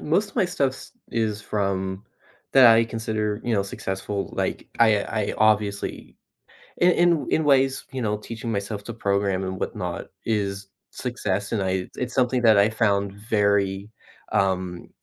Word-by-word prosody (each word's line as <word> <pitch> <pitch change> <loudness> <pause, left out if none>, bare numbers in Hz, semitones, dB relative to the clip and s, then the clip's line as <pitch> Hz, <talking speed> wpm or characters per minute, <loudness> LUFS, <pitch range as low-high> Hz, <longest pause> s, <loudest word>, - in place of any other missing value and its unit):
most 195 +7 +1
of - - -23
my 210 - +4
stuffs 140 -7 -2 0.2
is 110 -2 -1
from 95 -2 -2 0.5
that 135 -2 +8
I 115 0 +7
consider, 110 -2 -2
you 120 - 0
know, 100 - +2
successful, 100 0 -4
like, - - -2
I 110 -3 +5
I 105 -2 -2
obviously 105 -2 0 0.6
in 180 +1 +5
in 175 -2 +2
in 160 - +2
ways, 135 -2 +3
you 130 - -4
know, 105 -2 0
teaching 115 +2 -6
myself 100 0 -3
to 120 - -6
program 100 -3 0
and 95 0 -4
whatnot 90 -2 -4 0.2
is 100 -3 -1 0.2
success, 105 -6 -3
and 110 -3 0
I 95 -1 -1
it's 125 0 -3
something 125 -1 +2
that 110 -3 +6
I 100 +2 +5
found 100 -3 +1
very, 100 -1 0 0.4
um, 95 -3 -1
105 Hz, 155 wpm, -24 LUFS, 100-120 Hz, 0.6 s, that